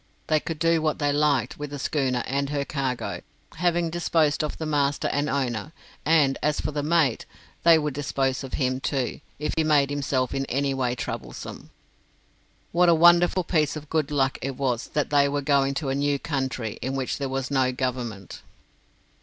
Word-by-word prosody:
They 155 Hz, -1 st, +2 dB
could 165 Hz, +1 st, -5 dB
do 165 Hz, 0 st, +2 dB
what 155 Hz, -1 st, 0 dB
they 145 Hz, -1 st, +1 dB
liked 145 Hz, -5 st, +1 dB
with 150 Hz, 0 st, -4 dB
the 145 Hz, -, -6 dB
schooner 130 Hz, -3 st, 0 dB
and 140 Hz, +1 st, -1 dB
her 145 Hz, -1 st, -1 dB
cargo, 135 Hz, -4 st, -3 dB, 0.4 s
having 175 Hz, -1 st, +1 dB
disposed 160 Hz, -3 st, +1 dB
of 150 Hz, -, -3 dB
the 160 Hz, -, -4 dB
master 145 Hz, -2 st, +1 dB
and 145 Hz, +2 st, 0 dB
owner; 130 Hz, -1 st, -2 dB, 0.3 s
and 150 Hz, -4 st, +3 dB
as 150 Hz, 0 st, +1 dB
for -, -, -2 dB
the 145 Hz, 0 st, -2 dB
mate, 150 Hz, -5 st, +1 dB, 0.3 s
they 165 Hz, -1 st, +7 dB
would 150 Hz, -2 st, -1 dB
dispose 135 Hz, -2 st, -1 dB
of 135 Hz, -, -5 dB
him, 130 Hz, -2 st, 0 dB
too, 135 Hz, 0 st, -2 dB, 0.2 s
if 150 Hz, -, -2 dB
he 160 Hz, -, +2 dB
made 145 Hz, -3 st, +3 dB
himself 135 Hz, -3 st, -1 dB
in 135 Hz, 0 st, -2 dB
any 140 Hz, +2 st, 0 dB
way 125 Hz, -2 st, -1 dB
troublesome. 65 Hz, -, -6 dB, 1.0 s
What 175 Hz, 0 st, +4 dB
a 170 Hz, -, +6 dB
wonderful 175 Hz, +2 st, +5 dB
piece 155 Hz, -4 st, +1 dB
of 150 Hz, -1 st, -9 dB
good 155 Hz, -2 st, +1 dB
luck 135 Hz, -2 st, 0 dB
it 135 Hz, 0 st, -4 dB
was 125 Hz, -4 st, -1 dB
that 150 Hz, -2 st, 0 dB
they 140 Hz, -1 st, +4 dB
were 145 Hz, 0 st, -2 dB
going 140 Hz, -1 st, +2 dB
to 140 Hz, -1 st, -2 dB
a -, -, 0 dB
new 140 Hz, +1 st, +1 dB
country 130 Hz, -7 st, -3 dB
in 130 Hz, +1 st, -2 dB
which 135 Hz, +1 st, -2 dB
there 140 Hz, -1 st, -2 dB
was 135 Hz, 0 st, -3 dB
no 130 Hz, -2 st, +2 dB
government! 125 Hz, -6 st, -4 dB
140 Hz, 190 wpm, -25 LUFS, 135-150 Hz, 1.0 s, they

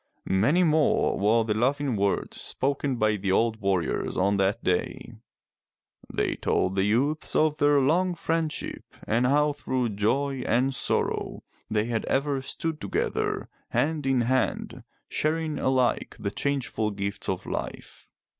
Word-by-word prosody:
Many 135 Hz, -, +3 dB
more 155 Hz, -2 st, +3 dB
were 110 Hz, +3 st, +3 dB
the 110 Hz, -1 st, 0 dB
loving 135 Hz, +3 st, +1 dB
words 100 Hz, -1 st, -1 dB
spoken 140 Hz, 0 st, -1 dB
by 110 Hz, -2 st, +1 dB
the 95 Hz, -1 st, -1 dB
old 110 Hz, +2 st, +1 dB
warriors 95 Hz, -4 st, 0 dB
on 100 Hz, +2 st, +2 dB
that 100 Hz, +4 st, +1 dB
day. 90 Hz, -1 st, -1 dB, 1.0 s
They -, -, -1 dB
told 95 Hz, +1 st, 0 dB
the 95 Hz, 0 st, +2 dB
youths 140 Hz, +9 st, 0 dB
of 155 Hz, -1 st, +2 dB
their 145 Hz, 0 st, +4 dB
long 175 Hz, +7 st, +2 dB
friendship 165 Hz, -2 st, -2 dB, 0.2 s
and 120 Hz, +3 st, +2 dB
how 150 Hz, +2 st, +3 dB
through 130 Hz, -4 st, -1 dB
joy 130 Hz, +7 st, 0 dB
and 130 Hz, +3 st, +1 dB
sorrow, -, -, -1 dB, 0.3 s
they 105 Hz, 0 st, +1 dB
had 115 Hz, -1 st, -2 dB
ever 140 Hz, 0 st, 0 dB
stood 155 Hz, +3 st, -4 dB
together, 100 Hz, -, -1 dB, 0.2 s
hand 150 Hz, -2 st, 0 dB
in 130 Hz, -2 st, +3 dB
hand, 130 Hz, +2 st, -1 dB, 0.3 s
sharing 155 Hz, 0 st, -1 dB
alike 130 Hz, -2 st, +1 dB
the 100 Hz, -, -3 dB
changeful 135 Hz, -4 st, -1 dB
gifts 100 Hz, 0 st, -4 dB
of 95 Hz, -2 st, -2 dB
life. -, -, -6 dB
130 Hz, 140 wpm, -26 LUFS, 105-145 Hz, 1.0 s, their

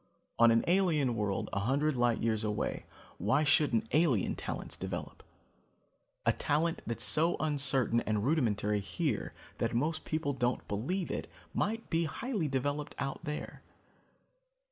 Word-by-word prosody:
On 115 Hz, 0 st, +8 dB
an 115 Hz, 0 st, +4 dB
alien 165 Hz, -9 st, +2 dB
world 105 Hz, -3 st, -1 dB
a 100 Hz, -, +1 dB
hundred 140 Hz, +7 st, +1 dB
light 120 Hz, -2 st, +2 dB
years 110 Hz, -1 st, +1 dB
away, 105 Hz, -1 st, -2 dB, 0.3 s
why 130 Hz, -, +2 dB
shouldn't 145 Hz, -5 st, +3 dB
alien 150 Hz, -, +3 dB
talents -, -, -5 dB
develop? -, -, -5 dB, 1.0 s
A -, -, +4 dB
talent 165 Hz, +4 st, 0 dB
that's 115 Hz, -, -1 dB
so 165 Hz, +3 st, +3 dB
uncertain 135 Hz, -6 st, +1 dB
and 105 Hz, 0 st, -1 dB
rudimentary 105 Hz, -8 st, +1 dB
here 125 Hz, -, -2 dB, 0.3 s
that -, -, 0 dB
most 155 Hz, +6 st, 0 dB
people 155 Hz, -3 st, -1 dB
don't 125 Hz, -1 st, -1 dB
believe 165 Hz, -, -2 dB
it, -, -, -4 dB, 0.2 s
might 225 Hz, +2 st, -1 dB
be 165 Hz, 0 st, +2 dB
highly 205 Hz, -, -2 dB
developed 145 Hz, +2 st, -2 dB
out 135 Hz, 0 st, -3 dB
there. 150 Hz, 0 st, -5 dB
135 Hz, 140 wpm, -32 LUFS, 115-155 Hz, 1.0 s, On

